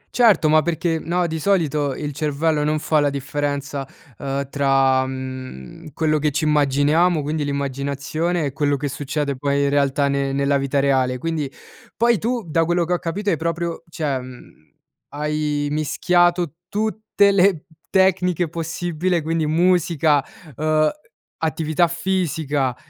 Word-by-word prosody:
Certo, 215 -10 +5
ma 155 0 +5
perché 165 0 -1
no, 175 +2 -1
di 160 -1 -3
solito 155 -7 +1
il 145 -1 -4
cervello 150 +1 0
non 155 +1 +1
fa 155 0 +1
la 145 -1 +2
differenza, 140 0 -3 0.3
ehm, 140 0 -3
tra, 135 -2 +2
mhmm, 130 - -8
quello 155 -1 +1
che 150 +1 +1
ci 150 +2 -2
immaginiamo, 150 +3 +3
quindi, 150 +1 -2
l'immaginazione 140 +4 -2
e 135 - -3
quello 145 -1 +1
che 145 0 -3
succede 140 0 -3
poi 140 +1 0
in 140 - +2
realtà 140 0 +2
ne 140 0 0
nella 140 0 +1
vita 140 +1 0
reale; 130 -2 +2
quindi, 155 -2 -3 0.5
poi 235 -2 +3
tu, 235 0 -1
da 165 +1 +2
quello 175 +1 +1
che 180 - -1
ho 175 - 0
capito, 200 +5 -2
hai 160 - +1
proprio 170 +1 -3
cioè 145 -5 -2
mhmm, 125 -1 -11 0.6
hai 150 -1 -1
mischiato 175 +2 +1
tutte 215 -1 +1
le 190 -4 +3 0.2
tecniche 180 -2 +2
possibile: 170 +1 -2
quindi 160 -1 0
musica, 165 -3 +2 0.3
uhm, 155 0 +2 0.5
attività 160 +1 +1
fisica, 160 -7 -1
150 Hz, 145 wpm, -21 LUFS, 140-170 Hz, 0.6 s, Certo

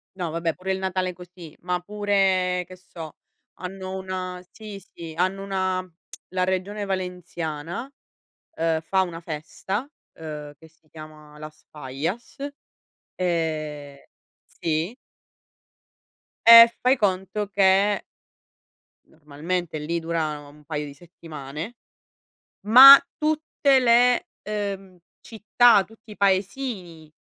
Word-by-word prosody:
No 180 -3 -3
vabbè 165 0 -2
pure 190 +1 -5
il - - -2
Natale 185 -1 -2
è - - -6
così, 175 -2 -13
ma 180 0 -2
pure 190 -2 0
che 185 - -11
so, 170 -4 -11 0.4
hanno 190 +1 -7
una 185 -1 -5
sì, 210 -2 -10
sì, 170 -3 -11
hanno 185 +2 0
una 185 -2 -2 0.4
la 185 0 -1
regione 190 +3 -2
Valenciana 180 - -5 0.7
uhm, 165 0 0
fa 190 +4 +1
una 170 -2 -5
festa, 170 - -5 0.3
uhm, 150 -2 -8
che 160 - -17
si 160 0 -34
chiama 155 -1 -13
Las 155 0 -12
Fallas 150 - -5 0.8
e 155 -5 -3 0.4
sì. 165 +6 -3 1.5
E 230 0 +11
fai 255 +2 +3
conto 200 0 -1
che 195 +1 +3 1.0
normalmente 155 +2 -5
lì 170 +3 -2
durano 155 -3 -3
un 150 +1 -18
paio 150 -1 -4
di 140 - -9
settimane, 160 - -9 0.9
ma 265 +5 +11 0.2
tutte 305 -3 +1
le 245 0 +4 0.2
uhm 195 -3 -5 0.2
città, 220 -1 +3
tutti 225 0 -16
i - - -12
paesini 190 - -2
185 Hz, 110 wpm, -24 LUFS, 160-200 Hz, 1.5 s, E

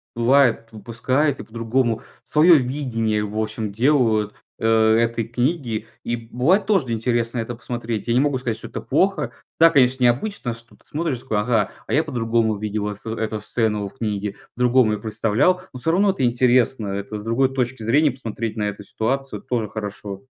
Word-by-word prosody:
бывает, 120 -1 +3
выпускают 125 +7 -1
и - - -6
по-другому. 115 +1 -1 0.2
Свое 155 +7 +5
видение, 115 -5 -1
в 105 +1 -6
общем, 110 -1 -3
делают, 115 -3 +2 0.2
э, 115 - 0
этой 115 +1 +3
книги, 120 -3 -1 0.2
и 120 - -1
бывает 125 - +1
тоже 180 - +2
интересно 115 +1 -1
это 115 +1 -4
посмотреть. 120 -2 -4
Я 115 - +2
не 125 - +4
могу 145 -2 +2
сказать, 120 -3 -2
что - - -9
это - - -6
плохо. 150 -4 +1 0.3
Да, 165 0 +7
конечно, 130 -3 +3
необычно, 125 - +1
что 115 0 -16
ты - - -25
смотришь 155 -4 -2
и - - -14
такой: 110 -5 -1
"Ага, 110 -1 +1 0.2
а - - -3
я 155 - +3
по-другому 115 -5 0
видел, 105 0 -3
а, 105 - -3
с 110 - -11
эту 110 -1 -3
сцену 105 -1 -1
в 130 - -14
книге, 105 -3 -3 0.2
по-другому 125 -2 +3
её 105 - -3
представлял". 110 - +1
Но 130 - -6
всё 125 - -1
равно 195 +3 +3
это 135 - -3
интересно, 120 -2 +2
это 100 +2 -4
с 105 - -8
другой 130 +4 +1
точки 125 -2 -2
зрения 140 +6 +3
посмотреть 115 -3 -5
на 105 -1 -1
эту 105 0 -8
ситуацию 135 +7 -3
тоже 115 -4 -2
хорошо. 105 -2 -6
115 Hz, 185 wpm, -22 LUFS, 110-130 Hz, 0.3 s, Да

